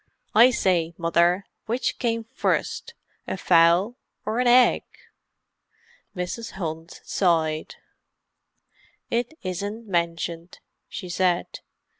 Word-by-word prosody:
I 235 +4 +8
say, 175 -8 +1
Mother, 170 +3 +2 0.2
which 240 +4 -1
came 230 -2 0
first, 470 - -2 0.3
a - - -3
fowl 175 +6 +4 0.3
or 220 +3 -1
an 250 - +2
egg?" 245 +1 +6 1.3
Mrs. 180 +6 -4
Hunt 165 -2 -6
sighed. 160 -4 0 1.4
"It 240 +6 -1
isn't 200 +5 -4
mentioned," 170 -1 -2 0.3
she 185 - -7
said. 175 0 0
185 Hz, 95 wpm, -24 LUFS, 170-230 Hz, 1.4 s, I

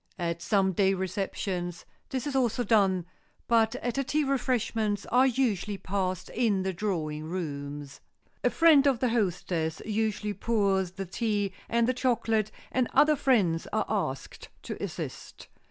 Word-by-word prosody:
At 170 -2 -2
some 195 0 +2
day 195 +1 +2
receptions, 185 -2 -3 0.2
this 260 -3 -3
is 285 -2 -3
also 245 -2 +1
done, 195 -5 +3 0.4
but 230 0 +3
at 245 0 -2
a - - +2
tea 300 +3 +1
refreshments 230 -6 0
are 255 +2 +5
usually 215 -6 0
passed 185 -2 -2
in 215 -6 +1
the 190 0 -1
drawing 160 -6 -2
rooms. 145 -4 -5 0.4
A - - +4
friend 310 -4 +5
of 270 -3 +3
the 250 +1 +1
hostess 180 -7 -1
usually 215 -1 -1
pours 195 -4 +1
the 195 +1 -5
tea 205 0 -1 0.2
and 235 0 +2
the 255 - +2
chocolate, 225 -4 +1 0.2
and 255 -2 +1
other 300 0 +6
friends 210 - +2
are 215 -1 +1
asked 185 -11 -3
to - - -6
assist. - - -7
205 Hz, 150 wpm, -28 LUFS, 185-240 Hz, 0.4 s, other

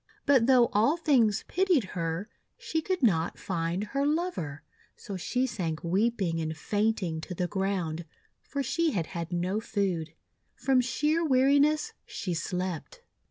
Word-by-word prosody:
But 265 -5 +4
though 250 -3 +6
all 230 +10 +3
things 250 - +3
pitied 355 - +2
her, 165 +3 -2 0.3
she 320 - -2
could 365 -2 -2
not 170 -7 +2
find 170 +1 -2
her 275 +7 -1
lover; 295 - -1 0.3
so 200 - -7
she 250 +8 0
sank 175 -10 -3
weeping 190 -1 +1
and 160 0 -3
faint 215 +2 0
ing 160 -2 -3
to 180 - -6
the 180 +1 -1
ground, 180 -4 -2 0.4
for 280 -1 -3
she 325 +4 +1
had 170 -5 0
had 170 0 -5
no 180 +4 0
food. 185 -8 -2 0.4
From 265 -2 +3
sheer 300 +6 +1
weariness 285 - +3
she 180 - -3
slept. 180 - -4
210 Hz, 150 wpm, -29 LUFS, 170-275 Hz, 0.4 s, though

